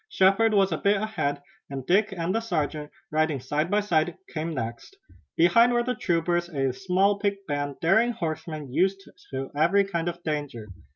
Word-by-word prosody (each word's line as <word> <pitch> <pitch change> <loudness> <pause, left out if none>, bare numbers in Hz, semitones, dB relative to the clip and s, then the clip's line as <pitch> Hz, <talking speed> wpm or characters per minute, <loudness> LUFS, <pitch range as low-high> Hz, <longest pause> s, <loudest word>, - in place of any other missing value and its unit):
Shepard 210 - +3
was 195 -2 +3
a 160 - -1
bit 200 0 +2
ahead, 145 -10 -2 0.3
and 135 -2 -6
Dick 200 +6 +3
and 175 -1 -2
the 225 - +1
sergeant, 155 -8 -2 0.2
riding 155 -2 +1
side 150 +6 -1
by 210 +1 +2
side, 175 -3 0 0.2
came 160 0 -3
next. 120 - -5 0.4
Behind 230 +9 +5
were 240 0 +2
the 250 +1 -1
troopers, 175 -3 0
a 135 -5 -1
small 195 +5 +1
picked 200 -1 -2
band, 145 -2 -2
daring 220 +8 +3
horsemen, 155 - -5
used 190 +4 +1 0.2
to 135 0 -5
every 170 +7 +4
kind 175 -3 -2
of 175 0 -8
danger. 145 -8 -4
170 Hz, 175 wpm, -26 LUFS, 150-200 Hz, 0.4 s, Behind